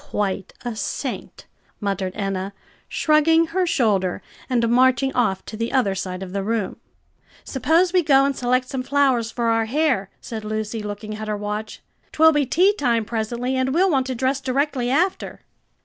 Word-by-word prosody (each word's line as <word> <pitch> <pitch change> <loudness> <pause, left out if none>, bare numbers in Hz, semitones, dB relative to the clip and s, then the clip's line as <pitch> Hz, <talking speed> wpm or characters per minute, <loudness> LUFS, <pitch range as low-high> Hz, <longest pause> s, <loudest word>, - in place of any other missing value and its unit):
"Quite 200 -5 -2
a 240 -2 -3
saint!" - - -5 0.3
muttered 195 -3 -2
Enna, 195 -1 -3 0.4
shrugging 320 +2 +3
her 370 -1 +1
shoulders 200 - +1 0.3
and 235 -2 +2
marching 255 +2 +3
off 205 -6 0
to - - -7
the 230 +2 -3
other 250 -8 +2
side 185 -1 -4
of 185 -1 -8
the 200 - -1
room. 220 0 -2 0.7
"Suppose 330 +7 +2
we 365 - +5
go 275 -4 +4
and 280 0 0
select 250 +1 +1
some 260 0 -3
flowers 260 -4 +2
for 235 0 -1
our 225 0 +2
hair," 255 -6 0
said 225 -3 -7
Lucy, 215 +1 -3
looking 210 +1 -6
at 215 0 -6
her 210 -1 -2
watch. 210 +1 -5 0.3
"'Twill 320 +1 +6
be 295 -3 +1
tea 370 +9 +4
time 235 - 0
presently, 235 +3 -2
and 260 +2 0
we'll 375 +2 +4
want 265 -3 +1
to 260 - -3
dress 265 +3 0
directly 265 -1 0
after." 350 +8 0
245 Hz, 175 wpm, -22 LUFS, 210-275 Hz, 0.7 s, Twill